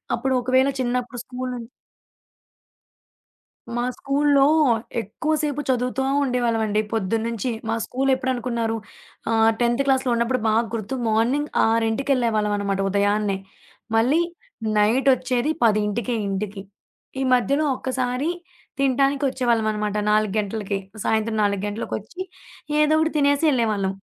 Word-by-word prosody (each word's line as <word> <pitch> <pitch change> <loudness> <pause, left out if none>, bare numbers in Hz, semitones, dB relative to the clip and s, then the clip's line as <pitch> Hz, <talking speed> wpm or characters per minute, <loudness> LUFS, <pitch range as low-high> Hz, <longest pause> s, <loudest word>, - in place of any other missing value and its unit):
అప్పుడు 265 0 -1
ఒకవేళ 260 +2 +3
చిన్నప్పుడు 245 0 -2
స్కూలు 255 0 -5
నుం 235 -1 -8 2.1
మా 240 - 0
స్కూల్లో 280 0 +3 0.6
ఎక్కువసేపు 295 - -2
చదువుతా 255 +1 0 0.2
ఉండేవాళ్ళమండి 230 -4 +1
పొద్దున్నించి. 225 +2 -1 0.2
మా 225 - 0
స్కూలెప్పుడనుకున్నారు 250 -3 -1 0.5
ఆహ్, 225 0 +4
10థ్ 240 +2 +2
క్లాస్‌లో 265 -1 +2
ఉన్నప్పుడు 235 +2 0
బాగా 220 +1 +3
గుర్తు 225 +3 -3
మార్నింగ్ 245 +7 +1 0.2
6కి 225 +5 +1
యెళ్ళేవాళ్ళంనమాట 210 -5 0
ఉదయాన్నే. 205 0 +1 0.6
మళ్ళీ 255 +9 +3 0.6
నైటొచ్చేది 255 +4 +2
10కే 215 +2 +1
ఇంటికి. 195 0 -4 0.6
ఈ - - 0
మధ్యలో 275 +5 +2
ఒక్కసారి 255 +4 -2 0.5
తింటానికి 275 +1 +2
వచ్చేవాళ్ళమనమాట, 220 -5 0
4 215 -1 +2
గంటలకి. 205 -1 -2 0.3
సాయంత్రం 220 0 0
4 200 -1 0
గంటలకొచ్చి 215 - -5 0.6
ఏదో 300 0 +4
ఒకటి 315 0 +1
తినేసి 285 +1 +2
యెళ్ళేవాళ్ళం. 215 -7 0
240 Hz, 100 wpm, -23 LUFS, 215-265 Hz, 2.1 s, ఆహ్